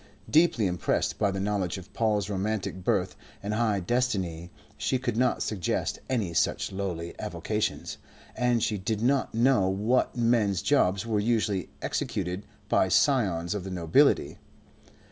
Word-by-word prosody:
Deeply 155 -9 +4
impressed 90 -2 0
by 105 - +2
the 95 0 -3
knowledge 100 -2 -1
of 95 +2 -12
Paul's 105 -2 +1
romantic 100 -2 -2
birth 95 -4 0 0.3
and 105 +1 -2
high 110 -2 +1
destiny 95 -6 -1 0.3
she 130 - 0
could 125 -3 -2
not 125 +2 +1
suggest 100 -6 -2
any 110 -10 -1
such - - 0
lowly 90 -4 -4
avocations, - - -3 0.4
and 125 -2 +1
she 105 -3 0
did 110 +3 -2
not 135 -2 +1
know 115 -5 +3
what 110 +7 +1
men's 115 -6 +2
jobs 100 -8 +2
were 110 -2 0
usually 105 -4 0
executed 90 +3 -3 0.2
by - - +3
scions 95 - +2
of 100 -3 -4
the 95 - -6
nobility. 85 -3 +2
105 Hz, 145 wpm, -27 LUFS, 95-115 Hz, 0.4 s, Deeply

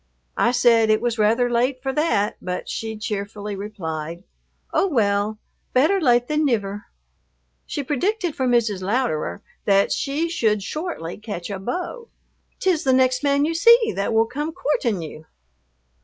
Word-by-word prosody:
I - - +4
said 235 -3 +4
it 215 0 +4
was 235 -2 -2
rather 225 +4 +3
late 250 +2 0
for 270 -1 -1
that, 300 -10 +1
but 180 0 -4
she 220 -1 -4
cheerfully 210 -1 -4
replied, 170 -5 -5 0.5
"Oh, 390 - +3
well, 210 - +1 0.4
better 315 +10 +3
late 245 -4 +3
than 305 0 +1
niver." 205 -7 -1 0.8
She 285 - -3
predicted 350 - -1
for 260 -2 0
Mrs. 225 -6 +1
Louderer 185 - -1 0.2
that 200 0 +3
she 295 +4 -1
should 220 - 0
shortly 305 - -5
catch 205 -4 -6
a 195 - -4
beau. 360 - -4 0.5
"'T - - -3
is 320 -4 -1
the 265 - +3
next 255 -1 +3
man 285 0 +2
you 325 - -1
see 460 +7 +5
that 200 - -1
will 225 0 +4
come 295 +7 -4
coortin' 235 - -1
you." 155 0 -10
235 Hz, 155 wpm, -22 LUFS, 205-290 Hz, 0.8 s, see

